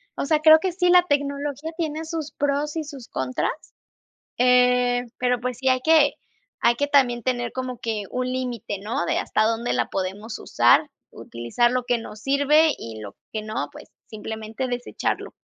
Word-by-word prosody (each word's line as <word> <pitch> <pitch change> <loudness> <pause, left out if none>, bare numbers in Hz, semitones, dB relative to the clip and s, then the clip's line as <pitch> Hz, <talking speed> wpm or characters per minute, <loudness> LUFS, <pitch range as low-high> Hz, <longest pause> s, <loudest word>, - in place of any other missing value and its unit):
o - - -2
sea, 305 +1 +2
creo 315 0 +9
que 375 +2 -1
sí, 360 0 +1
la 360 0 +7
tecnología 285 +1 -2
tiene 320 -1 -3
sus 320 -2 -5
pros 290 +1 -1
y 320 - -2
sus 280 -5 -10
contras, 130 -1 -2 0.9
eh, 250 0 +3
pero, 250 -1 +1
pues, 250 -1 -3
sí 265 +1 +1
hay 255 0 +2
que 310 0 +4 0.5
hay 235 0 +5
que 285 - 0
también 255 -5 +3
tener 240 -2 -1
como 255 -2 -5
que 220 -3 -3
un 250 0 -2
límite, 245 -5 -3
¿no?, 225 +8 -2
de - - +1
hasta 215 - +1
dónde 230 +1 -1
la - - 0
podemos 200 +4 -4
usar, 305 - +3 0.2
utilizar 120 - -1
lo 255 0 0
que 245 -1 +1
nos 220 -2 -9
sirve 285 +4 +3
y 110 -1 -8
lo 100 -2 -9 0.2
que 215 - -2
no, 215 +1 -4
pues, - - -12 0.2
simplemente 220 +3 -5
desecharlo. 245 0 -3
250 Hz, 180 wpm, -23 LUFS, 230-285 Hz, 0.9 s, creo